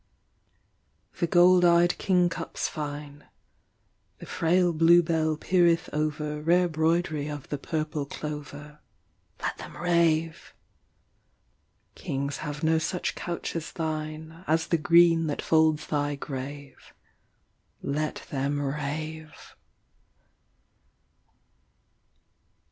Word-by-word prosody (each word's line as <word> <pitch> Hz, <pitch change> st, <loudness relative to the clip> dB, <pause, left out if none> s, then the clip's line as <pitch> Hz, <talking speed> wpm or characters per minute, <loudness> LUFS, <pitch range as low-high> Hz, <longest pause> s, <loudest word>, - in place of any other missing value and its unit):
6 -, -, -23 dB
The 170 Hz, -, +1 dB
gold 180 Hz, +1 st, +5 dB
eyed 175 Hz, 0 st, +4 dB
kingcups 180 Hz, -3 st, 0 dB
fine: 145 Hz, -1 st, -7 dB, 0.9 s
The -, -, -10 dB
frail 175 Hz, +1 st, +1 dB
bluebell 165 Hz, -1 st, +3 dB
peereth 170 Hz, 0 st, +2 dB
over 150 Hz, 0 st, -2 dB
Rare 175 Hz, +3 st, +3 dB
broidry 160 Hz, -2 st, 0 dB
of 145 Hz, -2 st, -7 dB
the 145 Hz, -, -3 dB
purple 155 Hz, -2 st, -3 dB
clover. 150 Hz, 0 st, -7 dB, 0.6 s
Let -, -, -2 dB
them -, -, -9 dB
rave. 165 Hz, -2 st, 0 dB, 1.4 s
Kings 140 Hz, +1 st, -4 dB
have 150 Hz, +2 st, -6 dB
no 160 Hz, 0 st, +3 dB
such 170 Hz, +3 st, -2 dB
couch 170 Hz, 0 st, -5 dB
as 165 Hz, -1 st, -4 dB
thine, 160 Hz, +1 st, -5 dB
As 160 Hz, +1 st, +2 dB
the 170 Hz, -, +2 dB
green 165 Hz, 0 st, +5 dB
that 145 Hz, -, -3 dB
folds 155 Hz, -1 st, +3 dB
thy 145 Hz, -1 st, -1 dB
grave. 140 Hz, 0 st, -8 dB, 0.9 s
Let 150 Hz, +2 st, -3 dB
them 140 Hz, +1 st, -1 dB
rave. 150 Hz, +2 st, -5 dB
155 Hz, 100 wpm, -27 LUFS, 150-170 Hz, 1.4 s, gold